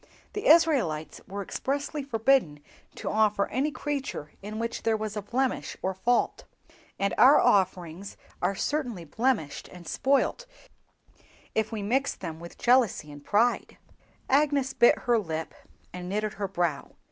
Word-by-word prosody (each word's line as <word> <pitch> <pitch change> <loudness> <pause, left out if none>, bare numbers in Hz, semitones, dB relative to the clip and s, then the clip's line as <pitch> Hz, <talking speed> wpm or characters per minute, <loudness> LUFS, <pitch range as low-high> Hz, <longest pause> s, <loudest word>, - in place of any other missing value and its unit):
The 415 - -3
Israelites 280 - +3
were 200 +1 -5
expressly 285 +7 -3
forbidden 230 - +2 0.4
to - - -7
offer 210 -2 +2
any 270 +5 0
creature 280 - -4
in 210 +2 -6
which 230 +1 -3
there 225 -1 +1
was 215 -1 -4
a 210 - -2
blemish 250 +5 -2
or 190 - 0
fault, 240 +6 0 0.5
and 200 0 0
our 270 +4 +8
offerings 185 -1 +1 0.2
are 200 - +1
certainly 245 - -2
blemished 210 - -1
and 175 -2 -13
spoilt 280 - +1 1.1
if 220 0 0
we 215 -3 -4
mix 265 +7 +1
with - - -21
them 165 -2 -6
jealousy 240 - +2
and 145 0 -11
pride." 230 +7 +1 0.5
Agnes 275 -1 +2
bit 240 - +5
her 240 -2 +2
lip 160 -5 -4 0.4
and 180 0 -6
knitted 210 +1 -1
her 200 -1 -3
brow. 175 -6 -2
220 Hz, 145 wpm, -27 LUFS, 185-265 Hz, 1.1 s, our